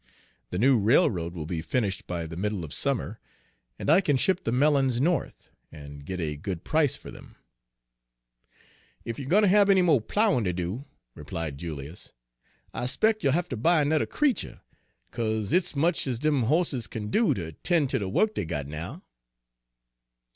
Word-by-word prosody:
The 90 - -4
new 125 +3 +4
railroad 100 - +2
will 80 -3 -5
be 80 0 -3
finished 105 +1 -2
by 85 -2 -3
the 80 0 -8
middle 100 -1 -2
of 75 - -5
summer, 130 -5 -2 0.6
and - - -6
I 190 - +6
can 145 -7 +1
ship 185 +7 +1
the 115 - 0
melons 135 -1 +2
North, 165 +1 -1 0.2
and 70 -2 -11
get 95 -1 -4
a 75 -3 -2
good 85 +2 -5
price 155 -3 +2
for - - -11
them." - - -14 1.7
"Ef 115 +2 -5
you 135 - -6
er - - -7
gwine 210 +4 +4
ter 200 - +5
hab 200 +1 +5
any 190 -2 +5
mo' 160 -7 +4
ploughin' 135 - +1
ter 90 - 0
do," 90 +10 -4 0.3
replied 80 -4 -6
Julius, 75 -1 -8 0.6
"I 125 - -2
'spec' 215 - +2
you'll 135 -4 +2
ha' 175 +2 0
ter 130 - -4
buy 160 +6 +3
ernudder 150 +1 +1
creetur, 295 -5 -1 0.5
'ca'se 110 -3 -2
hit's 180 -3 +2
much 160 +2 +1
ez 125 -3 -1
dem 145 -2 +1
hosses 145 -3 +1
kin 105 -1 -6
do 230 - +3
ter 85 -4 -5
'ten' 160 - +1
ter 130 0 -1
de 100 -3 -3
wuk 215 - +2
dey 100 - -3
got 80 -4 -3
now." 75 +3 -7
120 Hz, 185 wpm, -27 LUFS, -, 1.7 s, I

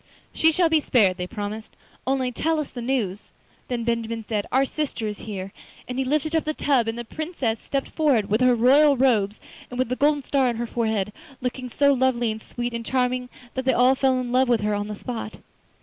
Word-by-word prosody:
'She 320 - +4
shall 340 +2 +3
be 320 -1 +3
spared,' 200 -10 +3
they 180 -1 -4
promised, 215 +1 -6 0.3
'only 260 -1 +1
tell 320 +5 0
us 300 - -4
the 245 - -6
news.' 230 -6 -2 0.4
Then 240 -2 -2
Benjamin 230 -1 -2
said: 210 -3 -1
'Our 265 +1 +3
sister 275 -5 -3
is 210 -1 -4
here!' 195 -1 -5 0.3
and 250 +1 -4
he - - +2
lifted 305 +4 0
up 320 - +2
the 310 0 -2
tub 260 -6 +2
and 225 +1 -2
the 240 - -5
Princess 275 -6 -3
stepped 275 -1 -3
forward, 275 -10 +2
with 215 +4 +1
her 250 -1 +5
royal 275 +5 +5
robes 220 -6 +2 0.3
and 245 - -7
with 255 -1 0
the 255 - 0
golden 290 +1 +2
star 265 -1 +2
on 235 - -2
her 235 +1 -2
forehead, 220 -4 -1 0.3
looking 250 0 -4
so 280 +3 +3
lovely 245 -3 +1
and 220 0 -6
sweet 240 +1 -5
and 235 0 -3
charming 250 0 0 0.2
that 260 - -2
they 260 - +3
all 250 +2 +5
fell 265 -1 +2
in 245 -1 -3
love 255 0 +3
with 235 -3 +3
her 210 0 0
on 205 0 -2
the 210 - -5
spot. 225 0 -6
250 Hz, 225 wpm, -24 LUFS, 225-270 Hz, 0.4 s, her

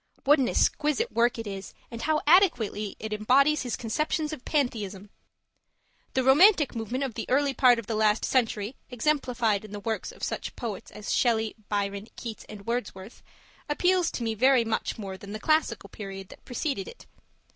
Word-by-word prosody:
What 290 +2 +5
an 255 - +2
exquisite 305 +11 +1
work 235 +1 +2
it 225 - -5
is, 195 -1 -7 0.2
and 230 0 -6
how 310 -1 +1
adequately 245 - +3
it 220 0 -4
embodies 275 +8 +3
his 245 -3 -2
conceptions 305 +6 -1
of 260 - -8
Pantheism! 210 -9 -2 1.0
The 260 - +2
Romantic 295 - +5
movement 235 +4 -3
of 265 -4 -3
the - - -5
early 275 +1 +2
part 250 -3 +5
of 230 - -5
the 225 - -3
last 215 0 +2
century, 225 -2 0
exemplified 245 -5 0
in 210 -1 -11
the 205 - -5
works 220 +2 -3
of - - -15
such - - -3
poets 225 -5 -6
as 210 - -5
Shelley, 225 -3 +2 0.2
Byron, 200 0 -2
Keats, 230 -3 -7
and 205 -2 -10
Wordsworth, 225 -3 -4 0.5
appeals 355 +3 +2
to 240 - -3
me 225 -1 -1
very 250 +2 +4
much 225 0 -2
more 195 -3 -6
than 200 +1 -9
the 215 - -5
Classical 300 -8 +1
period 195 -2 -8
that - - -15
preceded 250 - -3
it. 480 - -12
235 Hz, 180 wpm, -27 LUFS, 210-275 Hz, 1.0 s, What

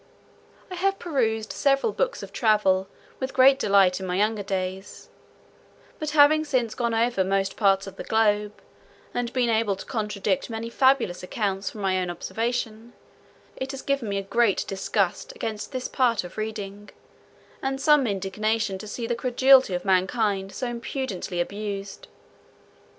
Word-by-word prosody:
I - - -4
have 390 +2 0
perused 225 -9 -1
several 275 +9 +2
books - - -1
of - - -10
travels 195 -4 +2 0.3
with 260 0 -4
great 270 +1 +6
delight 195 -5 +4
in 190 - -5
my 180 - -1
younger 210 +2 +1
days; 190 0 -5 0.9
but 305 - -2
having 305 +2 +6
since 255 -7 0
gone 235 -2 -1
over 230 -3 +2
most 195 0 0
parts 195 -2 +3
of 195 - -10
the - - -5
globe, 210 -1 +1 0.5
and 245 -1 -2
been 245 -2 +1
able 220 -3 +1
to 190 - -10
contradict 215 +3 -2
many 230 0 -5
fabulous 260 -9 +2
accounts 195 0 -2
from 210 - -9
my 190 -1 +1
own 180 - -3
observation, 225 +5 -3 0.6
it 260 - -5
has 270 -1 -6
given 275 -6 -1
me 200 - -1
a 195 - -2
great 220 0 +1
disgust 195 -1 -1
against 215 +2 -5
this 255 -2 -3
part 240 -6 +1
of 180 - -10
reading, 210 -2 -5 0.7
and 270 0 -2
some 295 -2 +4
indignation 205 +1 -1
to 215 - -8
see 230 +3 -4
the 240 - -1
credulity 255 -2 +4
of 180 - -4
mankind 195 +1 +1
so 255 - -4
impudently 235 -6 -4
abused. 200 +1 -4
220 Hz, 155 wpm, -25 LUFS, 195-250 Hz, 0.9 s, great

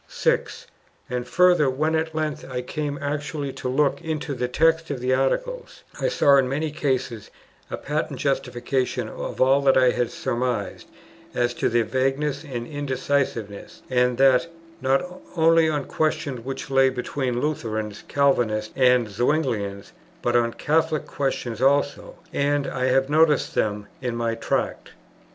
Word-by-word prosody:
6. - - -1 0.5
And 125 0 -2
further, 180 -6 +4
when 155 +5 0
at 160 0 -1
length 155 -2 -2
I 125 -1 -3
came 145 +2 -3
actually 145 -1 -3
to 130 - -4
look 140 +2 +1
into 155 -2 -3
the 125 -1 -2
text 165 +5 +2
of 140 -3 -3
the 125 +1 +1
Articles, 485 - -1 0.2
I - - +1
saw 140 - +4
in 130 -2 +2
many 150 +3 -1
cases 130 -7 -2 0.4
a - - -4
patent 145 -2 -3
justification 130 -1 -1
of - - -6
all 135 +2 +4
that 135 -1 +4
I 130 -1 +5
had 120 -1 -1
surmised 125 0 -3 0.5
as 120 0 +1
to - - 0
their 120 0 +2
vagueness 135 +4 -1
and 125 -6 -5
indecisiveness, 130 -6 -3
and 125 -1 +2
that, 135 +2 +4 0.3
not 135 +3 +2 0.3
only 165 -1 +4
on 145 -3 -1
questions 155 -6 -1
which 135 +1 -6
lay 135 0 +5
between 125 -1 -2
Lutherans, 110 -8 -3
Calvinists, 115 -6 +1
and 125 -3 +4
Zuinglians, 105 -4 -1 0.3
but 120 0 +1
on 115 -1 +2
Catholic 155 0 0
questions 125 -4 -3
also; 140 +1 +1 0.2
and 145 0 +1
I 130 - -2
have 135 +1 +3
noticed 150 -1 +3
them 105 -1 -1 0.2
in 125 -2 -2
my 115 -1 -1
Tract. 115 - -2
135 Hz, 150 wpm, -24 LUFS, 125-150 Hz, 0.5 s, I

